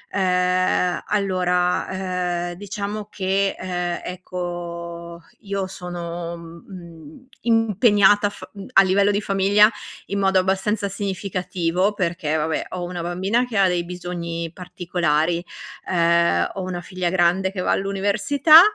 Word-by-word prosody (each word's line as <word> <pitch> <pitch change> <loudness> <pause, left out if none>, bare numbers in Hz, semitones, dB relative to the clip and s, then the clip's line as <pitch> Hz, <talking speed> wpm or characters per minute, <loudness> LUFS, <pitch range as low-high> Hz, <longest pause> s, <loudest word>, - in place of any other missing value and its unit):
Ehm, 180 -1 +2
allora, 180 -2 0
ehm, - - -6
diciamo 205 +2 -5
che, 195 0 0
ehm, 175 -1 -3
ecco 170 -2 -6 0.2
io 200 -2 -3
sono, 175 -2 -6
mhmm, 170 - -12
impegnata 210 -2 +4
a - - -2
f 205 - -12
uhm, 200 -1 -9
a 195 - +8
livello 195 +2 +3
di 205 +1 0
famiglia, 200 +2 +4 0.4
in 200 0 -2
modo 190 -1 +3
abbastanza 195 +2 0
significativo, 185 -1 -1
perché 170 -5 -1
vabbè, 160 +1 -1
ho 180 -1 -5
una 175 0 -4
bambina 190 +8 0
che 235 -4 -4
ha 195 - +5
dei 175 -1 0
bisogni 170 -2 -5
particolari. 175 -2 -1 0.5
Ehm, 170 - +3
ho 195 - -5
una 180 -1 -4
figlia 185 -1 -3
grande 185 +1 +2
che 185 -2 -4
va - - 0
all'università, 205 - +5
185 Hz, 130 wpm, -22 LUFS, 175-200 Hz, 0.5 s, a